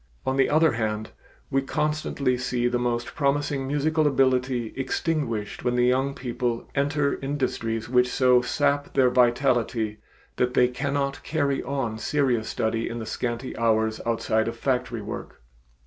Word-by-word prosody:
On 130 - 0
the 135 -1 +3
other 155 +1 +4
hand, 110 -1 -2 0.4
we 135 - +2
constantly 150 -2 -1
see 125 -1 -1
the 120 0 0
most 120 -1 -2
promising 140 -1 0
musical 150 +2 +1
ability 130 -4 +1
extinguished 135 -6 -2
when 125 0 +1
the 125 0 +3
young 135 +2 +1
people 120 -2 -3
enter 140 +1 0
industries 120 -5 -2
which 125 0 +3
so 125 -1 +4
sap 145 +3 0
their 130 -2 +4
vitality 120 -3 +2 0.4
that 125 0 0
they 125 - +5
cannot 140 +1 -2
carry 140 -3 0
on 120 -4 -3
serious 125 -3 0
study 115 +1 -1
in 120 - -5
the 115 - -5
scanty 120 +2 -3
hours 110 -1 +1
outside 110 -1 0
of 115 0 -4
factory 125 -3 -1
work. 105 - -8
125 Hz, 150 wpm, -25 LUFS, 115-140 Hz, 0.4 s, they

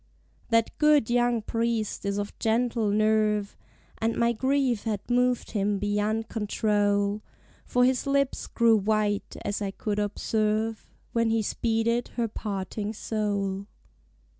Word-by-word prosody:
That 230 -1 +2
good 300 -6 +4
young 240 -2 +2
Priest 230 -2 -1
is 200 0 -1
of 205 0 -3
gentle 230 -1 +1
nerve, 210 -1 +2 0.4
And 225 +1 0
my 235 0 +2
grief 260 -1 +1
had 210 -3 -3
moved 250 0 +1
him 205 -1 0
beyond 210 +2 -1
control; 205 -1 0 0.4
For 250 0 +3
his 260 +1 +1
lips 275 -1 0
grew 230 -2 +4
white, 210 0 0
as 205 - -2
I 200 - -1
could 205 +1 -3
observe, 215 +1 -1 0.2
When 230 -1 +2
he 225 -1 +1
speeded 230 +2 0
her 235 -2 0
parting 205 0 -4
soul. 200 -3 -2
220 Hz, 130 wpm, -27 LUFS, 205-235 Hz, 0.4 s, good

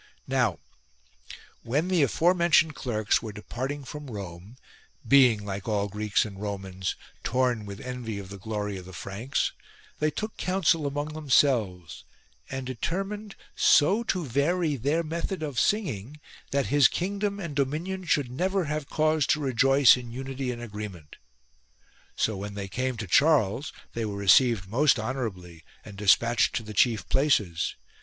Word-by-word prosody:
Now 125 -9 +1 1.0
when 145 +9 0
the 185 -3 +2
aforementioned 170 +2 +3
clerks 110 -6 0
were 110 - -6
depart 120 +5 -5
ing 145 -1 -6
from 145 +2 -8
Rome, 100 +1 -8 0.5
being, 125 -7 +5
like 100 -1 -5
all 105 -2 0
Greeks 105 +1 0
and 100 -2 -9
Romans, 95 -3 -4 0.3
torn 125 -4 0
with 100 0 -7
envy 125 -4 -5
of 100 -2 -8
the 100 0 -9
glory 105 -1 -3
of 90 - -9
the 95 - -11
Franks, 100 +10 -2 0.5
they 155 - +2
took 215 +7 -5
counsel 165 -5 +1
among 145 +2 -3
themselves, 120 - +1 0.5
and 130 0 -4
determined 195 - -4 0.2
so 190 +10 +4
to 185 -6 -1
vary 150 +5 +1
their 145 +7 0
method 165 +2 -3
of 145 -6 -2
singing 150 - -1 0.3
that 140 0 0
his 145 -4 +7
kingdom 200 +5 -2
and 170 -7 -5
dominion 160 +8 -2
should 145 -6 +1
never 185 +6 0
have 150 -1 -3
cause 155 -2 +2
to 155 - +2
rejoice 135 -1 +5
in 125 -2 -7
unity 135 +1 -4
and 120 -1 -5
agreement. 105 -8 -8 1.0
So 110 - 0
when 100 +1 -6
they 100 -1 -4
came 125 +5 -2
to 110 - -4
Charles 140 - +3 0.2
they 115 -1 -2
were 100 -1 -4
received 100 0 +4
most 135 +7 +3
honourably 100 - -5 0.2
and 105 - -10
despatched 115 +4 +3
to 115 - -1
the 105 0 -8
chief 110 +1 +2
places. 105 - +1
130 Hz, 150 wpm, -27 LUFS, 105-150 Hz, 1.0 s, his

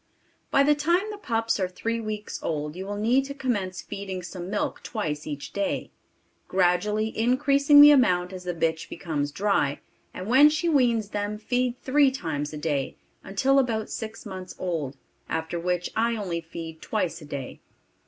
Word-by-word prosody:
By 275 - +4
the 295 +1 +5
time 345 +8 +1
the 420 - -7
pups 225 - 0
are 185 - +1
three 230 +5 -3
weeks 215 -1 -5
old, 150 -1 -3
you 190 +2 -6
will 205 0 -4
need 240 +6 +3
to 280 0 -6
commence 205 -9 -2
feeding 195 -2 -6
some 180 0 -7
milk 205 +1 -2
twice 155 -10 -4
each 145 -2 -6
day, 200 -1 -2 0.6
gradually 195 +4 +1
increasing 280 +5 +5
the 295 0 +11
amount 180 -10 +3
as 180 -1 -8
the 180 -1 -2
bitch 160 -1 -1
becomes 145 -4 -3
dry, 190 -7 +1 0.3
and 185 - -7
when 265 +7 +7
she 310 +3 -1
weans 240 -9 +2
them, 205 0 -3
feed 245 +3 -1
three 280 +1 +4
times 160 - -3
a 155 - -6
day, 145 -3 -2 0.3
until 265 +8 +2
about 225 -5 -1
six 225 +1 -6
months 185 -2 -7
old; 155 -7 -3 0.3
after 160 +1 -2
which 180 0 -1
I 230 +1 +2
only 180 -6 -3
feed 165 -1 -8
twice 180 -6 -2
a - - -10
day. 140 -3 -6
205 Hz, 175 wpm, -26 LUFS, 170-245 Hz, 0.6 s, the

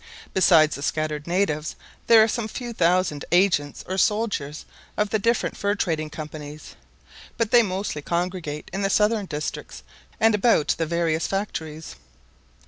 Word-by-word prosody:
Besides 165 -5 +5
the 140 - -8
scattered 155 0 -2
natives, 170 -4 -1 0.3
there 225 -2 +8
are - - +3
some 225 0 -2
few 240 +2 -6
thousand 175 -5 +1
agents 175 -6 +2
or 190 +1 -2
soldiers 200 -10 0 0.3
of 210 -1 0
the 220 - +1
different 230 +3 0
fur 200 0 0
trading 160 -6 -1
companies; 150 -1 -9 0.6
but 230 -2 0
they 240 - +7
mostly 190 -6 -3
congregate 170 -2 -3
in 195 - -2
the 195 - +1
southern 210 0 +2
districts 150 -2 -5 0.4
and 225 0 +4
about 210 -6 +3
the 165 - 0
various 165 -1 0
factories. 160 -6 -5
180 Hz, 145 wpm, -24 LUFS, 155-210 Hz, 0.6 s, there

